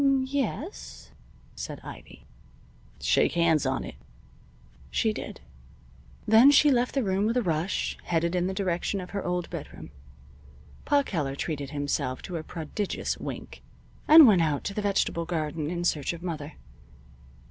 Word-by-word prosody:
"M 280 - +4
m 275 - +4
m - - -2
yes," 280 - -4 0.4
said - - -6
Ivy. - - -12 0.7
"Shake - - +2
hands 165 -3 +2
on - - -1
it." - - -7 1.0
She 70 - +1
did. - - -7 0.9
Then 225 +5 +8
she 290 +1 +6
left 250 0 +1
the 270 - +2
room 195 +1 +1
with 230 +3 0
a 245 - +2
rush, 165 +1 -1
headed 170 0 0
in 180 0 +1
the 190 - -2
direction 190 +1 -1
of 180 - -8
her 200 -1 -3
own 180 0 -1
bedroom. - - -8 0.9
Pa 285 -1 +3
Keller 150 - -2
treated 145 -2 -4
himself 145 -3 -2
to 180 -3 -5
a 160 - -5
prodigious 170 +5 -4
wink - - -7 0.5
and 315 0 +10
went 200 -7 +5
out 150 -3 0
to 200 - -3
the 210 - -2
vegetable 195 -4 0
garden 155 -2 -3
in 175 0 -3
search 155 -3 0
of 170 0 -9
Mother. 160 -4 -5
175 Hz, 160 wpm, -27 LUFS, 155-215 Hz, 1.0 s, and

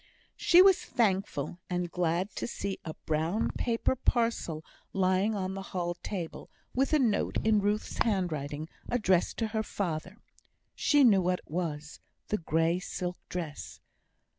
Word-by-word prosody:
She 355 +1 +7
was 385 -2 +6
thankful 195 -5 0
and 175 -1 -2
glad 175 +3 0
to - - -2
see 200 -4 -4
a 160 - -6
brown 160 +7 0
paper 235 +2 0
parcel 230 -11 0 0.3
lying 190 +3 +2
on 190 -1 -2
the 195 - -5
hall 175 -2 -3
table, 175 -1 -6 0.2
with 270 +2 +1
a 310 - +5
note 235 -7 +1
in 220 -1 +5
Ruth's 205 +1 -1
handwriting, 155 -8 -1 0.2
addressed 190 -7 +2
to 225 -2 -1
her 220 0 0
father. 185 -2 -3 0.6
She 290 -1 +4
knew 205 -6 +6
what 180 0 +1
it - - -20
was, 155 -3 -3 0.3
the 210 - 0
grey 165 +1 +1
silk 180 -1 -4
dress. 165 -5 -5
185 Hz, 145 wpm, -30 LUFS, 170-220 Hz, 0.6 s, She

